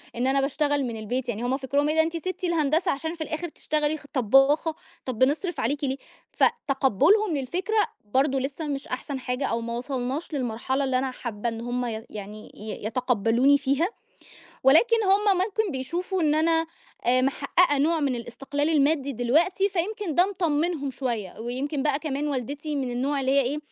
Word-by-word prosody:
إن 245 +2 0
أنا 275 +1 +3
باشتغل 290 +1 +1
من 230 -2 -4
البيت، 245 +4 -3
يعني 230 0 -3
هُم 255 +2 0
فكرهم 280 +2 0
إيه 305 - +1
ده 320 - +6
أنتِ 330 +1 -1
سِبتِ 370 +2 -5
الهندسة 325 -1 +2
عشان 320 +4 -3
في 335 - -10
الآخر 315 +3 -4
تشتغلي 305 0 -1
خ 290 - -16
طباخة، 270 +6 +3 0.3
طَب 250 -4 -4
بنصرف 305 +7 +1
عليكِ 285 +6 -1
ليه، 265 -1 0 0.3
ف - - -1 0.2
تقبلهم 295 - +3
للفكرة، 360 - -2 0.4
برضو 270 0 +3
لسّه 280 +4 -4
مش 280 -1 -4
أحسن 265 +2 -4
حاجة، 250 +2 -2
أو 230 -2 -1
ما 235 0 -4
وصلناش 265 +5 -3
للمرحلة 260 +1 -1
اللي 260 -1 +1
أنا 260 0 -1
حابّة 235 -2 -4
إن 225 0 -6
هُم 245 +1 -2
ي 225 -1 -4
يعني 210 +1 -9
ي 210 -1 -7
يتقبلوني 245 +3 +3
فيها، 280 +4 +1 0.8
ولكن 325 - +6
هُم 395 0 +3
ممكن 410 +2 0
بيشوفوا 345 +8 -2
إن 300 -1 +3
أنا، 325 +1 +2 0.4
آآ 250 +1 +4
محققة 285 +3 +2
نوع 320 +3 +2
من 280 -3 +1
الاستقلال 275 +5 -3
المادي 285 -2 +2
دلوقتي، 320 - +2
فيمكن 390 -1 -2
ده 355 +4 +5
مطمنهم 325 -5 0
شويّة، 235 -8 -4
ويمكن 265 +5 -3
بقى 285 -1 +1
كمان 295 -1 -2
والدتي 290 +3 -3
من 265 -3 -2
النوع 270 +4 -1
اللي 265 0 +1
هي 280 0 +5
إيه، 275 +4 -2
280 Hz, 180 wpm, -26 LUFS, 255-315 Hz, 0.8 s, ده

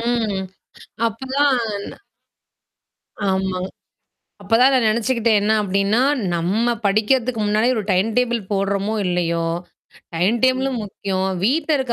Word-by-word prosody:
ம். 230 -4 -1 0.7
அப்பதான் 245 -3 -1 1.4
ஆமா. 190 -1 -1 0.8
அப்பதான் 250 +4 +4
நான் 250 - +3
நெனச்சுக்கிட்டேன் 230 0 +2
என்ன 210 +2 +1
அப்டின்னா, 200 +3 +1 0.3
நம்ம 200 +8 +1
படிக்கிறதுக்கு 225 +4 +1
முன்னாடி 215 +3 +2
ஒரு 215 - -2
டைம் 185 +4 +2
டேபிள் 240 -2 +1
போடுறோமோ 200 +1 0
இல்லையோ, 170 -2 0 0.7
டைம் 190 +8 +2
டேபிளும் 260 -1 +1
முக்கியம். 190 -1 -3 0.2
வீட்ல 300 +6 +2
இருக்க 260 -2 -1
220 Hz, 105 wpm, -20 LUFS, 195-245 Hz, 1.4 s, அப்பதான்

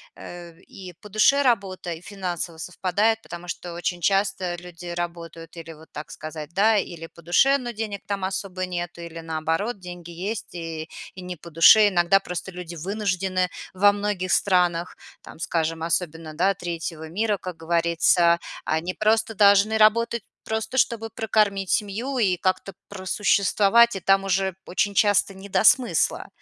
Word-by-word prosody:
э, 175 -1 -10
в 165 - -24
и 195 -9 -11
по 210 - -11
душе 215 +7 +4
работа, 195 -9 0
и 160 - -10
финансово 180 -3 -5
совпадает? 195 +6 0
Потому 175 0 -9
что 175 0 -6
очень 175 0 -3
часто 195 -1 +1
люди 175 0 -11
работают 170 -1 -6
или, 165 -1 -8
вот 160 +1 -17
так 150 0 -8
сказать, 155 -1 -7
да, 215 +4 +4
или 170 -4 -4
по 170 - -17
душе, 270 - +4
но 245 -3 -5
денег 215 -3 -5
там 200 -2 -3
особо 190 -1 -3
нету, 175 -1 -5
или, 170 -1 -8
наоборот, 165 +7 -2
деньги 175 -1 -9
есть- 195 +6 -5
и 165 -1 -6 0.3
и 185 - -8
не 180 0 -6
по 170 +2 -13
душе. 180 +7 +7
Иногда 185 +1 +3
просто 180 0 -6
люди 175 -1 -8
вынуждены 185 0 -1 0.2
во 205 +2 +5
многих 205 -3 -2
странах, 180 -2 +2 0.3
там, - - -13
скажем, 165 -1 -1
особенно, 165 -1 -2
да, 190 +4 +2
третьего 165 -3 -6
мира, 210 +4 0
как 180 -3 -7
говорится. 170 +1 +3 0.3
Они 165 +4 -1
просто 220 +1 +1
должны 205 +2 +5
работать, 225 +1 +3 0.2
просто 220 +4 -3
чтобы 225 -3 +1
прокормить 210 -3 0
семью 225 +6 -1
и 190 -6 +2
как-то 185 +1 -1
просуществовать, 205 +3 +3
и 195 - -3
там 195 +1 +3
уже 190 -1 0
очень 195 +3 -1
часто 205 -1 +3
не 195 +1 -11
до - - +1
смысла. 250 +2 +3
185 Hz, 160 wpm, -24 LUFS, 170-205 Hz, 0.3 s, душе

